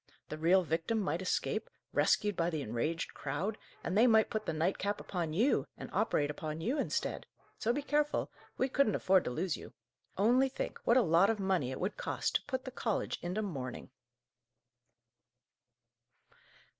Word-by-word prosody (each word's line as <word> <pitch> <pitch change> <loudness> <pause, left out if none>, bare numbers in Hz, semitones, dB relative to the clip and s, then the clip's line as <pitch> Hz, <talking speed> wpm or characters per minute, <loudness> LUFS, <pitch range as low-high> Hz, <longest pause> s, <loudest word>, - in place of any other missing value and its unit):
The 155 - -4
real 180 +4 +4
victim 165 +7 0
might 190 -3 -1
escape, 190 - -1 0.2
rescued 205 -1 +2
by 170 0 +1
the 155 -4 -2
enraged 135 +9 -2
crowd, 170 +10 -3 0.2
and 175 - -2
they 230 +4 +6
might 220 -2 +4
put 215 - -3
the - - +1
nightcap 185 +5 0
upon 170 -4 -3
you, 225 - +2
and - - -8
operate 145 0 +1
upon 155 +1 -5
you 245 - -1
instead! - - -2 0.3
So, 230 - +1
be 285 +4 -2
careful. 295 +1 0 0.3
We 260 - +2
couldn't 270 -5 +2
afford 190 -1 +3
to - - -1
lose 165 +6 -1
you. - - -11 0.4
Only 245 +7 +4
think, 260 - -4
what 235 - +5
a 255 - +5
lot 170 +4 +4
of 225 -2 0
money 190 -9 +1
it 130 - -5
would 190 +4 -2
cost - - -2
to - - -15
put 260 -2 -3
the 260 - -5
college 225 -4 -2
into 180 +5 -2
mourning!" 130 - -5
190 Hz, 170 wpm, -33 LUFS, 160-225 Hz, 0.4 s, they